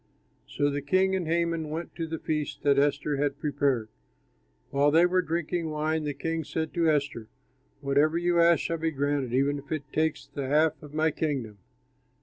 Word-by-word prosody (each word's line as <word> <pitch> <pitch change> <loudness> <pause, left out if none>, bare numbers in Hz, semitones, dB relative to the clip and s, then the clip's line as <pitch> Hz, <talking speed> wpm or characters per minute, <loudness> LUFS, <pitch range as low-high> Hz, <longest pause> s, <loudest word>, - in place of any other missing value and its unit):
So 145 0 0
the 145 0 -2
king 185 +6 +2
and 180 -4 -2
Haman 165 -1 0
went 165 +3 -5
to 165 -1 -3
the 160 0 -4
feast 150 -1 -3
that 140 -1 +4
Esther 145 0 +1
had 140 0 0
prepared. 140 -6 0 0.8
While 140 +1 +3
they 165 +4 +5
were 185 +1 +2
drinking 170 0 -2
wine, 155 +1 -1
the 145 -1 -3
king 165 +3 -2
said 160 +1 -3
to 170 -2 +2
Esther, 140 -7 -1 0.5
"Whatever 145 +4 +2
you 175 0 +2
ask 170 0 +5
shall 165 -1 -2
be 160 +1 0
granted, 145 -3 -1
even 140 +3 +1
if 140 - -15
it 155 -2 -2
takes 155 -1 0
the 140 -2 -5
half 150 +3 +2
of 150 -1 -11
my 155 0 +2
kingdom." 130 -10 -3
150 Hz, 185 wpm, -27 LUFS, 145-165 Hz, 0.8 s, they